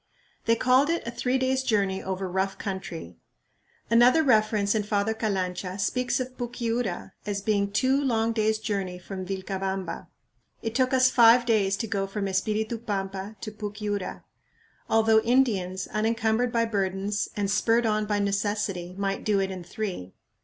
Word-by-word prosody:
They 230 - +4
called 255 +5 +3
it 335 0 -1
a 235 - -3
"three 250 +2 0
days' 260 0 +1
journey 200 -6 0
over 190 0 -3
rough 190 +1 -1
country." 175 - -6 0.7
Another 245 +7 +5
reference 215 -5 +3
in 220 - +1
Father 205 +1 0
Calancha 190 -4 -2
speaks 250 +6 0
of 255 0 -5
Puquiura 235 -6 -3 0.2
as 200 -1 -2
being 200 -2 +1
"two 260 +6 +2
long 230 -3 +1
days' 220 -1 +1
journey 200 -4 -3
from 185 0 -7
Vilcabamba." 190 0 -4 0.6
It 225 -1 -2
took 255 +2 +2
us 255 -1 +4
five 235 0 +6
days 200 -4 +2
to 225 - -2
go 200 -3 -2
from 195 0 -3
Espiritu 215 +4 -1
Pampa 195 -2 -4
to 215 - -5
Pucyura, 205 -2 -4 0.7
although 220 0 +4
Indians, 215 -7 +1
unencumbered 225 +2 +1
by 230 0 +2
burdens, 200 -1 -1
and 200 -1 0
spurred 230 +3 +2
on 215 -1 +1
by 205 -1 +1
necessity, 200 -3 -1
might 195 0 -2
do 210 -2 +2
it 195 0 -1
in 185 -2 -6
three. 180 - -5
210 Hz, 155 wpm, -26 LUFS, 195-230 Hz, 0.7 s, five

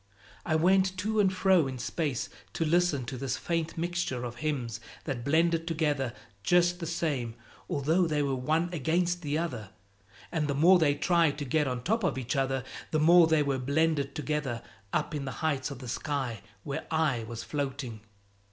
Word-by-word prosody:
I 160 - +2
went 190 +3 +3
to 215 +3 0
and 195 -2 +4
fro 185 -4 +3
in 130 -1 -5
space 140 +1 -2 0.3
to 165 - 0
listen 160 -5 +2
to 125 +2 -5
this 130 -2 -2
faint 165 +5 -2
mixture 170 -7 -2
of 120 -1 -5
hymns 125 -6 -2 0.2
that 130 -5 -4
blended 165 +3 +2
together 150 -7 0 0.3
just 175 - +3
the 165 - -4
same 145 -9 -2 0.3
although 160 +5 +2
they 150 -2 +1
were 140 -1 0
one 155 +7 0
against 175 +3 0
the 150 -1 -1
other; 125 - -3 0.6
and 155 -3 0
the 140 - -1
more 175 +6 +6
they 145 -3 +3
tried 165 -1 +2
to 145 - -4
get 150 +3 +1
on 125 -2 -3
top 220 - +1
of 160 -8 +1
each 130 +2 -2
other, 135 -1 0 0.3
the 155 - +1
more 170 +2 +7
they 160 -2 +3
were 140 -2 0
blended 140 +1 +1
together 150 -6 -2 0.3
up - - -1
in 145 -2 -3
the 135 - -4
heights 140 -4 0
of 140 - -7
the 125 0 -9
sky 130 -3 -2 0.2
where 140 - -4
I 155 -7 +1
was 115 0 -6
floating. 135 -6 -4
150 Hz, 185 wpm, -29 LUFS, 130-170 Hz, 0.6 s, more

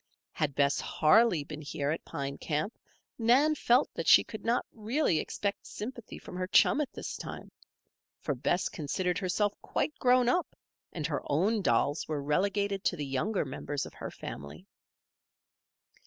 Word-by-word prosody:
Had 145 -3 -2
Bess 140 0 +2
Harley 175 0 +4
been 155 +1 -8
here 145 -1 -2
at 160 - -3
Pine 140 0 -5
Camp 155 +8 -2 0.4
Nan 255 +7 +4
felt 255 -2 +3
that - - -4
she - - +8
could 220 - -9
not 235 +2 +1
really 225 - 0
expect 200 +3 -3
sympathy 235 +1 -7
from - - -10
her 185 0 -2
chum 280 +8 +5
at 290 - -3
this - - -6
time; - - -8 0.7
for 145 - -2
Bess 140 +8 0
considered 180 +3 -2
herself 200 +2 0
quite 300 - -1
grown 250 -1 +4
up 350 +8 +1 0.4
and 155 -3 -4
her 150 - -1
own 200 +9 +1
dolls 145 -4 +1
were 150 -2 -2
relegated 200 +6 0
to - - +2
the 150 -4 -4
younger 150 +9 -1
members 140 +1 -4
of - - -11
her - - -6
family. 70 +5 -8
180 Hz, 160 wpm, -30 LUFS, 145-225 Hz, 0.7 s, she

